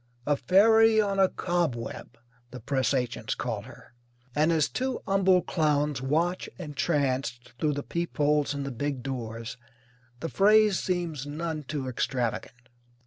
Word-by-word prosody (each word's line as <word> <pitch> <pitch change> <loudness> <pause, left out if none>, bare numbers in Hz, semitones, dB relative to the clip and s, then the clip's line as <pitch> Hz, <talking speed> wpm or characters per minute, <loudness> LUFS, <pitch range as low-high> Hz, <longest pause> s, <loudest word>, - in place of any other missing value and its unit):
"A 145 - +2
fairy 220 +6 +5
on 200 -2 +1
a 190 -1 +5
cobweb" 160 -13 -3 0.3
the 125 - -9
press 130 +2 0
agents 125 -3 -1
call - - -3
her, - - -15 0.4
and 155 +4 +3
as 160 -2 +3
two 260 0 -2
humble 190 -2 +3
clowns 150 -4 0
watch 165 +7 0
entranced 135 -7 -2
through 150 -1 +1
the 145 0 -4
peepholes 150 -4 0
in 140 - -3
the 140 - -4
big 135 +1 -3
doors 115 -4 -5 0.6
the 165 - -3
phrase 210 +2 +4
seems 170 -6 -2
none 155 +1 -3
too 145 -2 -4
extravagant. 125 -1 -3
150 Hz, 140 wpm, -27 LUFS, 130-175 Hz, 0.6 s, fairy